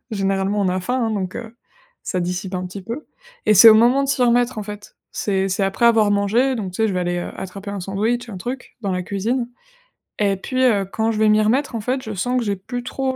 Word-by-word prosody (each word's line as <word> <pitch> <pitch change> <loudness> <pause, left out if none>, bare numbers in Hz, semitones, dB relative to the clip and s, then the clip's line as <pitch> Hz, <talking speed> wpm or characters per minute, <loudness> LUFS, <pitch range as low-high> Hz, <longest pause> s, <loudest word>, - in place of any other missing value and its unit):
généralement, 195 0 0
on 195 - +1
a 185 +1 -1
faim, 250 +6 -1
hein, 225 - -1
donc 190 -4 -3
heu, 230 -1 -8 0.5
ça 185 - -2
dissipe 180 +2 -3
un 180 - -3
petit 190 +2 -8
peu 235 +10 -6 0.4
et 215 - +5
c'est 220 +4 +10
au 220 - +9
moment 240 +5 +4
de 275 - -2
s'y 275 -2 +1
remettre, 245 0 +2
en 210 - -4
fait. 210 0 -10
C'est 195 -2 -1
c'est 195 +1 -1
après 195 +5 +1
avoir 225 -3 +4
mangé. 215 +6 +2
Donc 200 -6 -4
tu - - -8
sais, - - +4
je - - -2
vais 180 - -1
aller, 175 0 -1
heu, 175 - -4
attraper 195 +2 -7
un 200 -1 -4
sandwich, 220 +6 -1
un 200 - -7
truc 245 +7 -6
dans 195 -2 -1
la 180 0 -1
cuisine 230 +7 -2 0.7
et 200 -2 +2
puis, 255 +6 -1
heu, 205 -5 +3
quand 220 +4 -1
je 220 - -3
vais 220 - +4
m'y 215 0 +4
remettre, 245 +5 +1
en 225 - -2
fait, 255 +4 -1
je 220 -3 -5
sens 245 +7 -1
que 240 - -3
j'ai 200 -1 0
plus 245 +6 -6
trop 260 +1 -2
210 Hz, 260 wpm, -21 LUFS, 195-240 Hz, 0.7 s, c'est